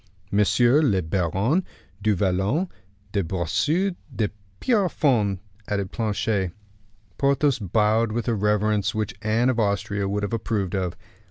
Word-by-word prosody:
"Monsieur 120 +7 +4
le 105 -11 +3
Baron 95 - +1 0.4
du 105 0 +2
Vallon 95 - +1 0.4
de 100 -1 0
Bracieux 145 - 0 0.2
de 105 -3 0 0.3
Pierrefonds," 145 - +2 0.3
added 100 -2 -2
Planchet. 105 -4 -1 0.7
Porthos 140 -1 +2
bowed 110 +3 +2
with 120 +2 -2
a 120 - +2
reverence 105 -1 +1
which 110 -2 -1
Anne 115 +4 +2
of 120 - -2
Austria 100 -1 0
would 105 +1 -1
have 100 - -2
approved 105 -4 -1
of. 90 -2 -1
105 Hz, 125 wpm, -24 LUFS, 100-120 Hz, 0.7 s, Monsieur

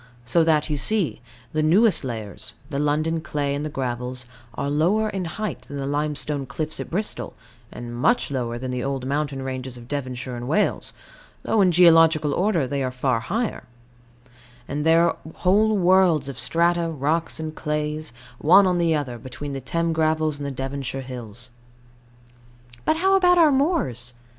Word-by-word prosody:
So 160 +8 +3
that, 155 -2 +2
you 150 - -1
see, 190 +5 +1 0.3
the 155 - +1
newest 190 +7 +4
layers, 110 -6 -6 0.2
the 140 - -2
London 155 +2 0
clay 145 -2 -2
and 145 +1 -3
the 155 - -3
gravels, 125 -2 -4 0.3
are 140 - -2
lower 180 +10 +2
in 190 -3 -3
height 215 +6 -4
than 145 - -9
the 135 - -3
limestone 145 -1 -2
cliffs 155 +3 -4
at - - -5
Bristol, 205 +5 -3 0.4
and 120 0 -7
much 190 - +1
lower 120 -3 -2
than 130 +1 -4
the 125 -1 -3
old 135 -2 -3
mountain 140 -1 -2
ranges 130 -1 -5
of 120 -1 -12
Devonshire 130 -2 -4
and 120 0 -6
Wales, 185 +9 0 0.5
though 220 - +2
in 185 -2 +4
geological 165 -3 +5
order 180 -5 +1
they 140 +2 -2
are 130 - 0
far 125 -1 0
higher; 220 - -3 1.0
and 150 +2 -2
there 165 +1 +5
are - - -1 0.2
whole 210 +4 +3
worlds 180 -5 +4
of 140 - -6
strata, 170 0 +1
rocks 160 +3 -1
and 155 -1 -4
clays, 150 -1 -3 0.3
one 190 +6 +6
on 180 -1 +1
the 165 -2 +2
other, 130 -5 -3
between 130 +4 -7
the 135 - -4
Thames 165 +5 -1
gravels 155 -1 +1
and 145 - -4
the - - -2
Devonshire 135 0 -4
hills. 120 -2 -8 1.3
But 315 - +2
how 385 +3 +3
about 360 -2 +5
our 320 -3 +6
moors? 265 - 0
150 Hz, 170 wpm, -23 LUFS, 130-170 Hz, 1.3 s, one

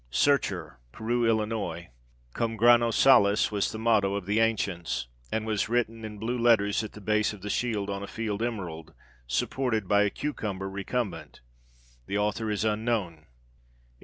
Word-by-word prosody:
"Searcher," 85 - +1
Peru, 120 - 0
Ill. 105 -6 -1 0.5
Cum 115 -1 -1
grano 120 +1 +5
salis 105 -4 +5
was 100 -2 0
the - - -6
motto 110 -3 +2
of 100 -2 -4
the 105 +3 +1
ancients, 100 - 0 0.3
and 110 0 -1
was 110 -1 -1
written 115 -1 -1
in 105 -1 -7
blue 120 +4 -2
letters 110 -3 +3
at 110 - -7
the - - -10
base 105 +1 +1
of 100 -3 -12
the 105 - -3
shield 110 -5 -1
on 100 -1 -3
a 100 - -6
field 110 -1 -3
emerald, 85 -9 -4 0.3
supported 110 - -1
by 100 +1 +4
a 105 - +3
cucumber 100 -8 -4
recumbent. 100 -2 -4 0.7
The 100 - -1
author 105 +2 -1
is 105 0 -1
unknown. 105 -8 -1
105 Hz, 160 wpm, -28 LUFS, 100-115 Hz, 0.7 s, grano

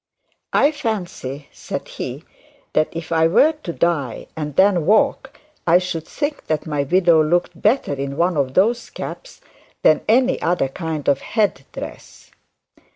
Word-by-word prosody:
'I 290 - +4
fancy,' 175 - -4
said - - -6
he, - - -6 0.5
'that 155 - +2
if 165 0 -7
I 160 0 +4
were 275 - +5
to 170 - -4
die, 160 -8 -1
and 150 -3 -5
then 190 -4 +3
walk, 265 +6 +2 0.3
I 170 +1 +6
should 175 -3 -3
think 290 0 -4
that 155 -2 -1
my 150 -3 -1
widow 170 +1 +4
looked 175 +3 0
better 215 - +2
in 140 0 -4
one 175 +1 +2
of 135 -3 -1
those 230 +6 +2
caps - - -8 0.4
than 155 - +5
any 255 +4 +3
other 170 -6 +1
kind 160 0 -5
of 140 -1 +2
head 205 - 0
dress.' - - -10
170 Hz, 155 wpm, -20 LUFS, 150-210 Hz, 0.5 s, I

